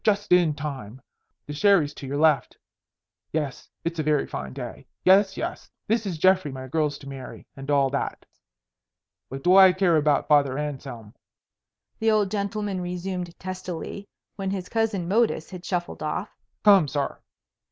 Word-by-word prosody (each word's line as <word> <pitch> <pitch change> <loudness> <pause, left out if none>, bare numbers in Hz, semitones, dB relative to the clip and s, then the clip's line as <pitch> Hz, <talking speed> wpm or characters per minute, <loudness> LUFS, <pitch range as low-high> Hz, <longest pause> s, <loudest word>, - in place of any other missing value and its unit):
Just 205 -2 +1
in 175 -4 +5
time. 135 -6 -6 0.5
The 145 - -6
sherry's 160 -3 +3
to 140 - -9
your 140 +2 -2
left. 155 -2 +2 0.7
Yes, 150 -4 -3 0.2
it's 170 -1 -2
a - - +1
very 150 -1 +2
fine 65 0 -6
day. - - -8 0.2
Yes, 195 +1 +5
yes, - - -5 0.2
this 220 -1 0
is 175 -4 -3
Geoffrey 185 -2 +3
my 130 0 -7
girl's 150 +1 0
to 140 - -13
marry 135 -2 -9
and 135 +1 -9
all 140 -2 +3
that. 140 - -3 1.0
What 135 +1 -7
do 180 +1 +5
I 190 -1 +8
care 180 -3 +3
about 150 -1 +2
Father 140 -3 +3
Anselm?" 135 -7 -6 0.9
the 225 - +2
old 210 -3 +2
gentleman 200 -2 -2
resumed 180 0 -4
testily, 185 +1 -6 0.3
when 195 -1 -2
his 190 -1 -4
cousin 225 -6 0
Modus 205 -5 +1
had 180 -2 -8
shuffled 175 -2 -3
off. 155 +6 -3 0.3
"Come, 195 -7 +6
sir." 140 0 -2
170 Hz, 160 wpm, -25 LUFS, 145-195 Hz, 1.0 s, I